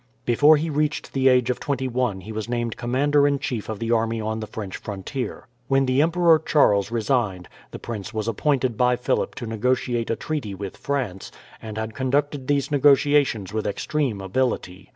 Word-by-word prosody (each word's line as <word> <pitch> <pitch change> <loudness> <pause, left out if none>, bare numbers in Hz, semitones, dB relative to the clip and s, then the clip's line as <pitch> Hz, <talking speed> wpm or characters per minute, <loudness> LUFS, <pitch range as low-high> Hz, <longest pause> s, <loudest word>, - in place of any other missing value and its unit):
Before 145 +6 +5
he 155 +3 -2
reached 150 +1 -1
the 135 -1 +2
age 125 -1 +4
of 125 - -4
twenty 130 -2 -2
one 120 -6 -1
he 110 - -9
was 110 +1 -5
named 120 -2 -2
commander 140 +4 +2
in 140 -1 +1
chief 120 -6 -4
of 110 - -3
the 115 +2 -3
army 115 0 +1
on 110 0 -2
the 110 - -5
French 100 -4 -6
frontier. 105 +3 -6 0.2
When 135 0 +3
the 130 +2 +2
Emperor 165 0 +4
Charles 110 -11 +3
resigned, 115 - -1 0.2
the - - -8
prince 110 -3 -6
was 110 -1 -3
appointed 130 0 0
by 125 0 +3
Philip 125 - -1
to 120 - -6
negotiate 120 +1 -1
a 115 - +1
treaty 140 -11 -4
with 95 0 -6
France, 125 -10 -3 0.3
and 110 -1 -7
had 110 0 -4
conducted 135 +2 -1
these 145 0 0
negotiations 140 -7 +3
with 110 -1 -1
extreme 115 +1 -2
ability. 95 -3 -2
120 Hz, 185 wpm, -23 LUFS, 110-140 Hz, 0.3 s, Before